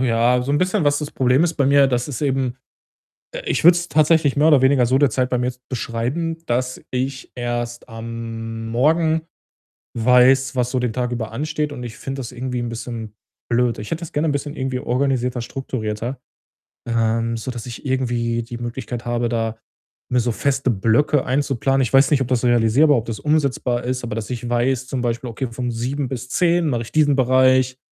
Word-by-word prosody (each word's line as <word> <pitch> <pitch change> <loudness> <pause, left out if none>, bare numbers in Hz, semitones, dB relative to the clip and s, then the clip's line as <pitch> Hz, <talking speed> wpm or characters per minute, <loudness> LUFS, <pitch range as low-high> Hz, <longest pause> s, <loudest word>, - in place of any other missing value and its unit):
ja, 125 0 +3
so 140 +3 -2
'n 145 - +2
bisschen, 185 -1 +1
was 145 0 +3
das 150 -1 -5
Problem 130 +3 +2
ist 170 -1 -1
bei 140 - +1
mir, 140 0 +5
dass 125 -2 0
es 145 - -5
eben 135 -3 0 0.8
äh, - - -5
ich - - 0
würde 175 0 +8
es 175 0 -3
tatsächlich 155 -1 +3
mehr 150 +2 +4
oder 140 -4 +5
weniger 130 -2 +4
so 130 +2 +3
derzeit 130 -3 +2
bei 125 - +1
mir 125 - 0
jetzt 125 0 -5
beschreiben, 130 +8 -2
dass 125 +1 -1
ich 130 0 -3
erst 120 -1 -4
am 115 -1 -6
Morgen 160 +6 +2 0.7
weiß, 125 +3 +4
was 125 -1 0
so 130 - 0
den 125 -3 -1
Tag 125 0 -2
über 110 -2 -3
ansteht 150 +3 -2
und 125 -3 -7
ich 115 -2 -8
finde 135 0 -5
das 125 -2 -6
irgendwie 125 0 -4
'n 120 - -3
bisschen 115 -2 -6 0.3
blöd. 120 -1 +1
Ich 105 - -7
hätte 165 +1 -2
das 170 - -8
gerne 150 +2 +1
'n - - +1
bisschen 145 +1 -3
irgendwie 130 -1 -2
organisierter, 125 -2 0
strukturierter, 120 -1 -4 0.7
ähm, 115 0 0
sodass 120 +1 -6
ich 120 +3 -8
irgendwie 120 -3 0
die 120 0 -7
Möglichkeit 120 0 -5
habe, 120 0 -1
da 115 -1 -2 0.5
mir 125 0 +3
so 120 0 0
feste 135 +2 0
Blöcke 115 +7 +2
einzuplanen. 135 0 +1
Ich 125 - -2
weiß 135 +1 +5
nicht, 145 -3 +3
ob 125 - -4
das 125 -2 0
realisierbar, 120 +5 +4
ob 115 - -4
das 110 -3 -5
umsetzbar 140 -5 0
ist, 125 0 -2
aber 115 - -4
dass 110 -1 -4
ich 120 -1 -4
weiß, 125 +1 0
zum 130 -2 -2
Beispiel 120 0 -2
„Okay, 130 +3 -3
von 125 0 -3
7:00 130 +4 -2
bis 125 -1 -5
10:00 170 -1 +2
mache 120 -4 -1
ich 115 - -10
diesen 145 -3 +3
Bereich, 130 0 +3
125 Hz, 200 wpm, -21 LUFS, 120-140 Hz, 0.8 s, würde